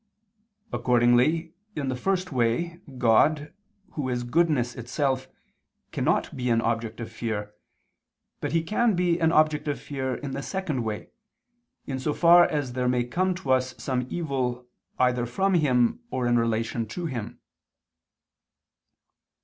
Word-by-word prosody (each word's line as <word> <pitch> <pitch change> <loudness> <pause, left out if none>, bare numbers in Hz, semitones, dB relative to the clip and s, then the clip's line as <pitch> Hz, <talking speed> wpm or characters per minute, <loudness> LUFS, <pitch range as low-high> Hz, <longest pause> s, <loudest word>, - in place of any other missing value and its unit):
Accordingly, 125 +7 +3 0.2
in 140 -3 -2
the 130 - -1
first 185 +6 -1
way 130 +8 0 0.2
God, 145 +6 +3 0.4
Who 140 -4 -3
is 125 -1 -1
goodness 125 -2 +1
itself, 130 +2 -1 0.6
cannot - - 0
be 125 -1 -2
an 115 -1 +3
object 115 -1 -2
of 115 -1 -6
fear; 110 -2 -4 0.9
but - - -3
He 165 0 +1
can 215 +4 +1
be 175 -1 +1
an 160 -1 +3
object 155 -1 +2
of 145 - -1
fear 130 -3 -3
in 140 -2 -6
the 140 - -4
second 155 -7 -3
way, 110 -2 -5 0.7
in 135 -1 -4
so 145 +3 -1
far 175 0 +7
as 145 -5 -2
there 125 0 0
may 125 -1 +2
come 180 +9 0
to 180 -7 -3
us 130 -1 +1
some 125 -2 -2
evil 130 -7 -2 0.3
either 125 -1 +2
from 190 +11 0
Him 130 - +3
or 125 - -2
in 120 0 +3
relation 115 0 -1
to 175 +10 -5
Him. 125 -9 -5
130 Hz, 145 wpm, -26 LUFS, 120-160 Hz, 0.9 s, far